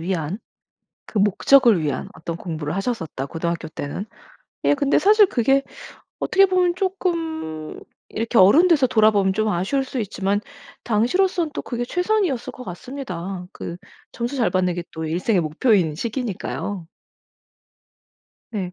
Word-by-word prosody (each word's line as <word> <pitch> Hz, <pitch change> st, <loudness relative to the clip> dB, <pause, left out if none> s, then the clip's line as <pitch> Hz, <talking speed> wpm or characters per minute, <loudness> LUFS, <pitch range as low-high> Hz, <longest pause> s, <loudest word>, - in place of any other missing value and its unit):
위한 175 Hz, +1 st, -2 dB, 0.7 s
그 215 Hz, -, -5 dB
목적을 210 Hz, 0 st, +5 dB
위한 145 Hz, -3 st, -2 dB
어떤 165 Hz, +1 st, -5 dB
공부를 160 Hz, -3 st, -4 dB
하셨었다, 190 Hz, -, -3 dB
고등학교 170 Hz, +2 st, -3 dB
때는. 155 Hz, +6 st, -5 dB, 0.6 s
예 -, -, +4 dB
근데 285 Hz, -1 st, +2 dB
사실 420 Hz, +2 st, +6 dB
그게 270 Hz, +1 st, +2 dB, 0.6 s
어떻게 390 Hz, +1 st, +4 dB
보면 365 Hz, -2 st, +2 dB
쪼끔 325 Hz, -, -3 dB, 0.3 s
이렇게 230 Hz, +1 st, 0 dB
어른 240 Hz, -, +7 dB
돼서 305 Hz, -7 st, +4 dB
돌아보면 215 Hz, -4 st, +3 dB
좀 215 Hz, +1 st, +1 dB
아쉬울 210 Hz, +9 st, 0 dB
수 260 Hz, -1 st, -4 dB
있지만 200 Hz, -1 st, -1 dB, 0.4 s
당시로서는 325 Hz, -, +1 dB
또 -, -, -3 dB
그게 240 Hz, -1 st, -3 dB
최선이었을 360 Hz, -, 0 dB
것 255 Hz, -, -10 dB
같습니다. 185 Hz, -4 st, -6 dB
그 170 Hz, -, -6 dB, 0.4 s
점수 240 Hz, +4 st, -3 dB
잘 240 Hz, -4 st, +2 dB
받는 180 Hz, -1 st, +1 dB
게 175 Hz, -, -3 dB
또 160 Hz, 0 st, -5 dB
일생의 180 Hz, +5 st, +1 dB
목표인 165 Hz, -, +2 dB
시기니까요. 205 Hz, -, -4 dB, 1.6 s
네. 190 Hz, -5 st, -4 dB
215 Hz, 300 characters per minute, -22 LUFS, 175-275 Hz, 1.6 s, 어른